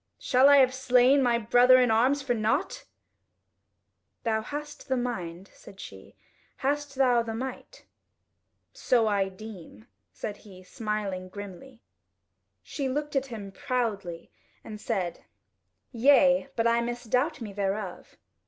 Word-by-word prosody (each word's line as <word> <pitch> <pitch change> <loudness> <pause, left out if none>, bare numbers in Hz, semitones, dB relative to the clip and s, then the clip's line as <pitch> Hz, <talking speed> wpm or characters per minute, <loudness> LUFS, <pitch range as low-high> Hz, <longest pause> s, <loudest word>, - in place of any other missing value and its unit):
Shall 260 +2 +4
I 285 - +7
have 260 -2 +5
slain 260 +1 +4
my 240 -2 +2
brother 245 +3 +5
in 250 -2 +3
arms 260 +6 +2
for 260 -2 0
nought?" 250 - -1 1.4
"Thou 220 -2 0
hast 295 +5 -7
the 260 -1 0
mind," 190 -7 -5
said 195 - -15
she, - - -11 0.5
"hast 290 0 -1
thou 250 -3 +3
the 225 -1 -5
might?" 265 - -7 0.9
"So 235 -3 +2
I 200 -2 +1
deem," 185 - -12 0.3
said 210 -2 -6
he, 185 -3 -15
smiling 200 -2 -4
grimly. 205 +6 -10 0.8
She 275 -3 -4
looked 295 +2 -3
at 270 0 0
him 210 -6 -8
proudly 200 -8 -3 0.3
and 210 -2 -9
said: 190 -7 -3 0.7
"Yea, 270 +2 +4
but 230 - 0
I 235 0 +3
misdoubt 245 +5 -1
me 215 -4 -7
thereof." 195 -1 -4
235 Hz, 130 wpm, -27 LUFS, 205-265 Hz, 1.4 s, I